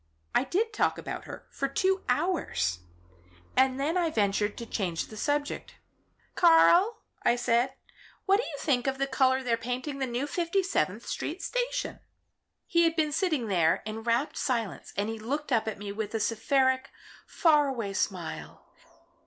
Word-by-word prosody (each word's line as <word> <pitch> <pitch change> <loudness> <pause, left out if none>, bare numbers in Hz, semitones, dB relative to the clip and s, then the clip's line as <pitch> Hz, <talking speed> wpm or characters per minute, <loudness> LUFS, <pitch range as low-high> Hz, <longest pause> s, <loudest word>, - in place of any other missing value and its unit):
I - - +3
did 435 - 0
talk - - +1
about - - -6
her - - -9
for 275 - -1
two 380 +7 +1
hours, 250 - 0 0.8
and 260 0 +3
then 310 +6 0
I 345 -2 +2
ventured 205 -4 0
to 235 - -5
change 180 -7 -2
the 215 - -10
subject. 290 +6 -2 0.6
'Karl,' 350 +6 +5 0.2
I 240 - +3
said, 245 +2 +1 0.5
'what 390 0 +5
do 455 - -1
you 295 - -6
think 270 -4 0
of 270 0 0
the 275 - +1
colour 265 -1 +2
they're 235 -2 +1
painting 255 +4 -4
the 265 - -1
new 245 +3 -2
Fifty 345 +5 0
seventh 210 - -1
Street 350 +5 -4
station?' - - -2 0.7
"He 340 - +2
had 330 -1 +3
been 310 -2 +1
sitting 310 - 0
there 170 -6 +2
in 220 +1 -5
rapt 235 +6 0
silence 235 -8 -2
and 200 +1 0
he 225 0 -4
looked 280 +6 -3
up 225 -3 +2
at 220 - -3
me 205 0 -6
with 215 +1 -4
a - - +1
seraphic, 260 +4 +1 0.4
far 300 -4 +4
away 230 -7 -3
smile. 170 - -4
260 Hz, 170 wpm, -28 LUFS, 220-320 Hz, 0.8 s, Karl